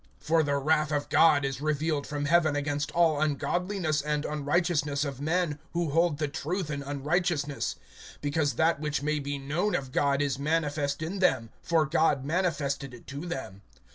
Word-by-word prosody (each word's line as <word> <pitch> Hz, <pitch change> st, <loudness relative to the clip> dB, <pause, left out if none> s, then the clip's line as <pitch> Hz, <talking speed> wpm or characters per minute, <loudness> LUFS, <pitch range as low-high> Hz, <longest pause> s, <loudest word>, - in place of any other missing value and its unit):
(18)For 160 Hz, 0 st, +3 dB
the 145 Hz, -1 st, 0 dB
wrath 155 Hz, +2 st, +2 dB
of 145 Hz, -1 st, -1 dB
God 150 Hz, -4 st, +5 dB
is 135 Hz, 0 st, -3 dB
revealed 155 Hz, -1 st, 0 dB
from 145 Hz, -1 st, -3 dB
heaven 155 Hz, -1 st, +3 dB
against 145 Hz, 0 st, -1 dB
all 160 Hz, -3 st, +3 dB
ungodliness 155 Hz, +2 st, 0 dB
and 150 Hz, 0 st, -1 dB
unrighteousness 150 Hz, -1 st, 0 dB
of 140 Hz, -1 st, -5 dB
men, 160 Hz, -1 st, 0 dB
who 170 Hz, -3 st, 0 dB
hold 165 Hz, 0 st, +2 dB
the 150 Hz, 0 st, -1 dB
truth 155 Hz, +4 st, -3 dB
in 140 Hz, -1 st, -3 dB
unrighteousness[1:18]; 145 Hz, +1 st, -1 dB, 0.5 s
(19)because 145 Hz, -2 st, 0 dB
that 160 Hz, 0 st, +2 dB
which 150 Hz, -2 st, -2 dB
may 150 Hz, 0 st, 0 dB
be 140 Hz, 0 st, -3 dB
known 155 Hz, +10 st, -1 dB
of 135 Hz, -2 st, -3 dB
God 140 Hz, +1 st, +2 dB
is 140 Hz, -2 st, 0 dB
manifest 145 Hz, -1 st, 0 dB
in 185 Hz, +5 st, -4 dB
them; 115 Hz, -11 st, +2 dB
for 165 Hz, -2 st, +2 dB
God 150 Hz, -3 st, +2 dB
manifested 145 Hz, -5 st, -1 dB
it 120 Hz, -, -15 dB
to 140 Hz, +5 st, -6 dB
them. 130 Hz, -, -6 dB
150 Hz, 170 wpm, -28 LUFS, 140-165 Hz, 0.5 s, God